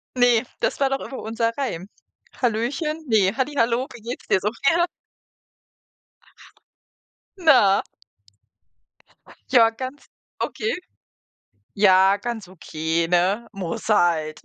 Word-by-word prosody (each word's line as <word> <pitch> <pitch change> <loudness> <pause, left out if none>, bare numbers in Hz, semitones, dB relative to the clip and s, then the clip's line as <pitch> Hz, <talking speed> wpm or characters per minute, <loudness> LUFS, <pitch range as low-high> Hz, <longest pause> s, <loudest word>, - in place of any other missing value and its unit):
Ne, 245 -2 +4 0.2
das - - -1
war 275 -1 +2
doch 270 0 -1
immer 265 - -7
unser 230 +1 -1
Reim. 200 -10 -3 0.5
Hallöchen 275 +7 -1
ne, 205 -5 +2
halli 270 +2 -1
hallo 235 +1 +1
wie 240 - -12
geht's 235 +3 -7
dir 190 - +3
so. 210 - -1 0.2
Ja. 345 +1 +3 2.5
Na? 255 - +5 1.7
Ja, 230 -3 +6
ganz 260 +5 -8 0.3
okay. 440 +3 -2 1.0
Ja, 195 -1 +5
ganz 225 -3 -5
okay, 165 -2 -2
ne, 185 +6 +2
muss 190 0 -5
halt. 160 -6 +2
225 Hz, 110 wpm, -23 LUFS, 190-260 Hz, 2.5 s, Ja